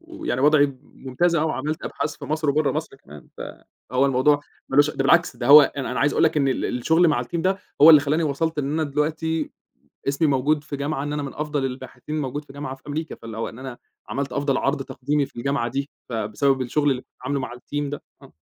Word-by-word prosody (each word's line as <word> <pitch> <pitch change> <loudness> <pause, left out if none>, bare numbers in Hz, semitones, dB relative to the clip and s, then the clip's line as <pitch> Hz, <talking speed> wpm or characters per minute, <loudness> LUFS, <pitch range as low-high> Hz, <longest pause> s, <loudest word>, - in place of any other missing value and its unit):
ويعني 330 - -4
وضعي 145 -2 +4
ممتاز، 145 +7 -1
آه، 155 - +1
وعملت 155 +2 -3
أبحاث 150 - -3
في - - -9
مصر 155 0 -2
وبرا 150 0 +1
مصر - - -4
كمان، 75 +1 -15
فهو 130 +4 -3
الموضوع 140 +2 +3 0.3
مالوش 145 +2 +4
ده - - -13
بالعكس - - +3
ده 120 - -4
هو 145 +1 +10
أنا 140 -2 -2
أنا 125 - -2
عايز 145 - +3
أقول - - +3
لك 155 - +2
إن 140 -2 +2
ال 130 - -1
الشغل 160 +7 +2
مع 125 -5 +1
الteam - - -10
ده 190 +2 +1 0.2
هو 160 - +11
اللي 150 - +9
خلّاني 150 +3 0
وصلت 155 +2 -1
إن 140 0 -1
أنا 160 0 0
دلوقتي 160 +2 -1 0.6
اسمي 145 +3 +2
موجود 145 +2 +1
في 145 - -5
جامعة 140 0 -2
إن 145 0 -3
أنا 150 -1 -2
من 135 - -6
أفضل 150 -2 -2
الباحثين 135 +3 -5
موجود 145 +2 -4
في 135 - -14
جامعة 145 -1 -6
في - - -29
أمريكا، 155 +2 -4
فاللي 115 -1 -9
هو 115 - -3
إن 115 - -11
أنا 130 -2 -8 0.3
عملت 140 -2 -3
أفضل 140 -1 0
عرض 140 0 0
تقديمي 140 +2 -1
في - - -23
الجامعة 130 -1 -1
دي 140 +3 -3 0.2
فبسبب 120 +4 0
الشغل 145 +3 +1
اللي 130 -1 -1
كنت - - -46
عامله 140 +1 -1
مع - - -5
الteam 145 +3 -4
ده، 145 - -6 0.2
آه. - - -15
145 Hz, 230 wpm, -23 LUFS, 130-150 Hz, 0.6 s, هو